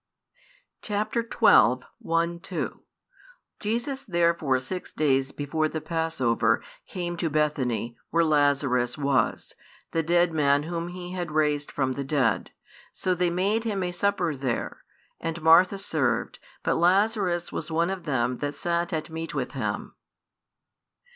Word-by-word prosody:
Chap. 210 0 -2
xii. 235 - +2 0.8
1, 170 +1 0
2. 180 - -4 0.8
Jesus 240 +6 -2
therefore 170 - +1
six 180 +8 -6
days 135 -3 +1
before 155 +2 -1
the 155 - -4
passover 160 -8 0 0.2
came 175 -1 -4
to 165 -1 -1
Bethany, 130 -7 0
where 170 +1 +3
Lazarus 140 -5 +2
was, 140 -5 0 0.4
the 165 - +1
dead 175 +1 +3
man 145 -2 +3
whom 170 +1 -3
He 180 0 -7
had 180 -2 -3
raised 150 -2 +1
from 130 -2 0
the 140 +2 -3
dead. 135 -3 +1 0.4
So 185 - -1
they 180 0 +1
made 195 +6 +1
Him 205 -4 -1
a 180 - -2
supper 180 -3 0
there: 130 -3 -3 0.4
and 165 0 -3
Martha 170 +4 +6
served; 135 - -1 0.2
but - - +1
Lazarus 185 0 +2
was - - -4
one 165 +3 +1
of 185 -3 -5
them 125 -4 0
that 145 0 -3
sat 170 +2 -1
at 160 0 -3
meat 165 0 -5
with - - -2
Him. - - -3
165 Hz, 140 wpm, -26 LUFS, 145-175 Hz, 0.8 s, Martha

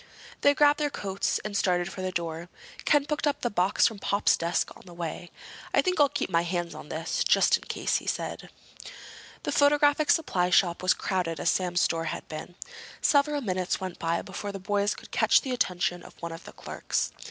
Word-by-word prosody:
They 285 0 +5
grabbed 290 0 +4
their 295 -1 +1
coats 195 -7 -2
and 210 -1 -4
started 180 -1 +1
for 190 - -7
the 185 0 -2
door. 170 0 -4 0.4
Ken 290 -1 +4
picked 300 0 -1
up 290 - -1
the 240 - -1
box 185 +1 +2
from 220 -3 0
Pop's 200 +1 +2
desk 170 +1 -1
on - - -15
the 175 - -12
way. 170 +1 -5 0.5
"I - - +4
think 365 -3 0
I'll 290 -1 +6
keep 285 - -2
my 170 -2 +2
hands 175 0 -2
on 150 - -10
this—just 160 +2 +2
in - - -15
case," - - 0
he - - -8
said. - - -3 0.9
The - - -2
photographic 290 +1 +3
supply 180 - +2
shop 175 -1 +3
was 185 0 +4
as - - -17
crowded 175 -5 -2
as - - +2
Sam's 180 -1 0
store 165 -1 +1
had - - -5
been. 155 +3 -8 0.4
Several 290 0 +2
minutes 185 -5 -1
went 185 -2 -6
by 165 0 -1
before 200 +1 -6
the 200 - -6
boys 205 +1 0
could - - -13
catch - - +4
the 265 - -5
attention 180 -7 0
of - - -14
one 170 -1 -5
of 165 +1 -9
the - - -11
clerks. - - -3
185 Hz, 210 wpm, -27 LUFS, 175-275 Hz, 0.9 s, I'll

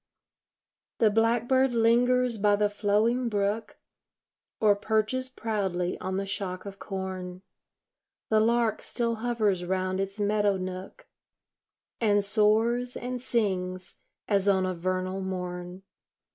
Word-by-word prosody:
The 220 -2 +4
blackbird 240 +4 +2
lingers 240 +1 +3
by 205 0 +4
the 205 0 +1
flowing 220 +4 +1
brook, 205 +1 -1 0.8
Or 210 -2 +5
perches 220 +5 0
proudly 195 -7 -2
on 185 0 -3
the 195 - -2
shock 190 -1 -4
of 195 -1 -8
corn; 185 -2 -5 0.9
The 220 - +4
lark 230 0 +2
still 230 -2 -1
hovers 215 -6 0
round 185 +1 -1
its 195 +2 -3
meadow 205 -1 +2
nook, 185 0 -7 0.9
And 205 -3 +2
soars 225 +4 +2
and 250 0 -4
sings 185 -7 -2 0.3
as 200 -1 +1
on 190 -2 +3
a 185 - -1
vernal 185 +2 -2
morn. 180 0 -5
205 Hz, 115 wpm, -27 LUFS, 190-230 Hz, 0.9 s, Or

